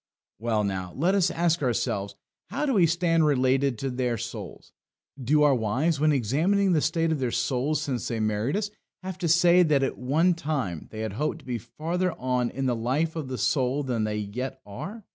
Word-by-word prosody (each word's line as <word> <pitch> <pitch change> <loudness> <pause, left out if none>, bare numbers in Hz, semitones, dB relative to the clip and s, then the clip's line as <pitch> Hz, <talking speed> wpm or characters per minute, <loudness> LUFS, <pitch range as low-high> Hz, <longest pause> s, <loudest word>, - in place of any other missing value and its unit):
Well, 110 -2 0
now, 95 -3 -3
let 175 +7 +2
us 195 -3 +3
ask 170 -1 +1
ourselves: 100 -5 -1 0.3
How 290 +2 -1
do 275 - +1
we 185 -6 +5
stand 165 0 +2
related 135 -2 +2
to 135 +3 -3
their 125 -2 -1
souls? - - -7 0.5
Do 150 +5 +3
our 145 -2 +5
wives, 130 +7 0
when 155 +1 +4
examining 165 - +2
the 155 - +3
state 165 +2 +1
of 155 - 0
their 130 -2 0
souls 130 +5 0
since 130 -5 -2
they 115 - -2
married 110 - 0
us, 205 -1 -2 0.3
have 185 -1 -6
to 175 - -1
say 175 +2 +5
that 150 -5 +3
at 135 - -2
one 155 +8 +2
time 135 - -3
they 110 - -7
had 110 -3 -3
hoped 150 +8 -1
to - - -21
be 120 -2 -3
further 170 +9 -2
on 125 -1 -1
in 135 +1 -3
the 125 -2 +1
life 135 +8 -1
of 155 -4 -4
the 130 -1 -4
soul 130 +2 +1
than 120 -5 -1
they 105 0 -1
yet 105 +6 -4
are? 195 - -8
135 Hz, 205 wpm, -26 LUFS, 120-165 Hz, 0.5 s, we